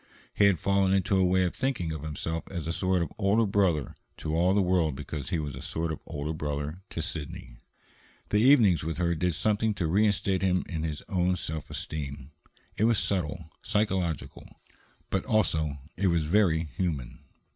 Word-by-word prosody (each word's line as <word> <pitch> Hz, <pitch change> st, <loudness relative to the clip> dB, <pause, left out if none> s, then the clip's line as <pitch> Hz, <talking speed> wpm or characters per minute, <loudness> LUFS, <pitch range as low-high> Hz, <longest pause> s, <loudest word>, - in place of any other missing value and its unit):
He 100 Hz, -, +4 dB
had 100 Hz, -3 st, +5 dB
fallen 100 Hz, +2 st, +2 dB
into 95 Hz, 0 st, +2 dB
a 95 Hz, -, +4 dB
way 95 Hz, +1 st, +3 dB
of 90 Hz, -, 0 dB
thinking 115 Hz, -12 st, -1 dB
of 80 Hz, -2 st, -5 dB
himself 80 Hz, +2 st, -4 dB
as 85 Hz, -5 st, -4 dB
a 85 Hz, -, -2 dB
sort 95 Hz, -1 st, +1 dB
of -, -, -6 dB
older 105 Hz, +3 st, +3 dB
brother 95 Hz, -8 st, +1 dB, 0.2 s
to 75 Hz, -, -3 dB
all 90 Hz, +3 st, +3 dB
the -, -, +4 dB
world 90 Hz, -5 st, +2 dB
because 70 Hz, -1 st, -5 dB
he 85 Hz, -, 0 dB
was 75 Hz, -4 st, -4 dB
a 65 Hz, -, -8 dB
sort 80 Hz, 0 st, -2 dB
of 80 Hz, -, -4 dB
older 75 Hz, +2 st, -3 dB
brother 75 Hz, +2 st, -4 dB
to 80 Hz, -, -4 dB
Sidney. 70 Hz, -7 st, -6 dB, 0.7 s
The 105 Hz, -, +3 dB
evenings 115 Hz, -, +5 dB
with 80 Hz, 0 st, -3 dB
her 85 Hz, -1 st, +1 dB
did 90 Hz, 0 st, 0 dB
something 105 Hz, +3 st, +1 dB
to 90 Hz, -, -1 dB
reinstate 95 Hz, +1 st, +2 dB
him 90 Hz, -1 st, +2 dB
in 80 Hz, -3 st, -3 dB
his 80 Hz, -2 st, -4 dB
own 90 Hz, -1 st, +1 dB
self 80 Hz, -3 st, -5 dB
esteem. 70 Hz, -2 st, -5 dB, 0.5 s
It 110 Hz, -, +3 dB
was 115 Hz, -1 st, +3 dB
subtle, 85 Hz, -5 st, -2 dB
psychological, 95 Hz, -7 st, -1 dB, 0.6 s
but 95 Hz, -, 0 dB
also 80 Hz, -, +1 dB, 0.2 s
it 95 Hz, +2 st, +2 dB
was 85 Hz, -3 st, +2 dB
very 85 Hz, -2 st, +3 dB
human. 75 Hz, -6 st, -3 dB
85 Hz, 185 wpm, -28 LUFS, 80-95 Hz, 0.7 s, had